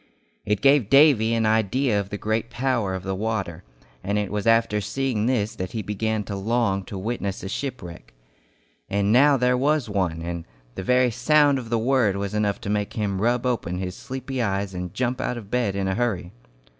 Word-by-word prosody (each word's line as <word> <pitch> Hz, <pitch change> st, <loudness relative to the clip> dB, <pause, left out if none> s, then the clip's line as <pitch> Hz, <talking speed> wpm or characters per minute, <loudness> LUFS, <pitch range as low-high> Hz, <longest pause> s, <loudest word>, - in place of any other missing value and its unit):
It 105 Hz, -1 st, 0 dB
gave 135 Hz, -6 st, +4 dB
Davy 135 Hz, -5 st, +5 dB
an 115 Hz, -1 st, +1 dB
idea 110 Hz, +2 st, +2 dB
of 100 Hz, -1 st, -4 dB
the 105 Hz, -, -4 dB
great 110 Hz, +2 st, -2 dB
power 120 Hz, -6 st, -1 dB
of 95 Hz, -, -6 dB
the 95 Hz, 0 st, -2 dB
water, 95 Hz, -5 st, -3 dB, 0.4 s
and 100 Hz, +1 st, -1 dB
it 105 Hz, -2 st, -2 dB
was 105 Hz, +1 st, -2 dB
after 115 Hz, -2 st, +3 dB
seeing 110 Hz, +1 st, -1 dB
this 110 Hz, -5 st, 0 dB
that 95 Hz, 0 st, -5 dB
he 110 Hz, -2 st, -3 dB
began 105 Hz, +2 st, -2 dB
to 100 Hz, 0 st, -5 dB
long 100 Hz, -1 st, 0 dB
to 100 Hz, -, -7 dB
witness 100 Hz, -1 st, -3 dB
a -, -, -4 dB
shipwreck. 100 Hz, -8 st, -6 dB, 0.8 s
And 100 Hz, +1 st, +1 dB
now 140 Hz, +4 st, +5 dB
there 125 Hz, 0 st, +2 dB
was 140 Hz, -1 st, +1 dB
one, 90 Hz, -5 st, -1 dB
and 85 Hz, -1 st, -5 dB, 0.3 s
the -, -, -5 dB
very 125 Hz, +4 st, +3 dB
sound 145 Hz, +3 st, +3 dB
of 120 Hz, -3 st, -8 dB
the 115 Hz, -, +1 dB
word 115 Hz, -4 st, +2 dB
was 100 Hz, 0 st, -3 dB
enough 105 Hz, -1 st, 0 dB
to -, -, -5 dB
make 105 Hz, -1 st, -1 dB
him 100 Hz, -3 st, -2 dB
rub 120 Hz, +2 st, +1 dB
open 105 Hz, -8 st, -1 dB
his 90 Hz, 0 st, -4 dB
sleepy 130 Hz, -1 st, -5 dB
eyes 100 Hz, -3 st, -1 dB
and 90 Hz, -1 st, -5 dB
jump 125 Hz, 0 st, -2 dB
out 125 Hz, -, -2 dB
of 105 Hz, -4 st, -10 dB
bed 120 Hz, -6 st, 0 dB
in 100 Hz, -1 st, -1 dB
a 95 Hz, -, 0 dB
hurry! 100 Hz, -6 st, -1 dB
110 Hz, 205 wpm, -24 LUFS, 100-125 Hz, 0.8 s, Davy